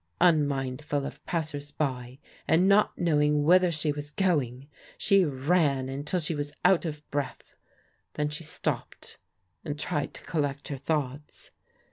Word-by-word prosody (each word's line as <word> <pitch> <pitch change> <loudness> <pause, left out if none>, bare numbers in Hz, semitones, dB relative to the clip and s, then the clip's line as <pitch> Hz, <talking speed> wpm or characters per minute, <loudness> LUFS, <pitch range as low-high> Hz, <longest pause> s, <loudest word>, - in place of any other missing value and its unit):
Unmindful 145 -3 +1
of - - -8
passers 150 -4 -3
by, 130 -4 -3 0.3
and 175 +4 +4
not 200 +2 +4
knowing 150 -3 +2
whither 180 +3 +5
she 155 -1 0
was 145 0 -6
going, 145 -8 0 0.3
she 195 -2 +4
ran 140 -2 +1
until 145 +6 -1
she 165 0 -1
was 145 -1 -3
out 185 -2 +5
of 150 -2 -5
breath. 145 -2 -4 0.6
Then 150 0 0
she 150 +2 -5
stopped 155 - -4 0.4
and 145 0 -4
tried 145 -1 -2
to - - -10
collect 145 -3 -2
her 140 - -3
thoughts. 145 0 -3
150 Hz, 140 wpm, -28 LUFS, 140-165 Hz, 0.6 s, whither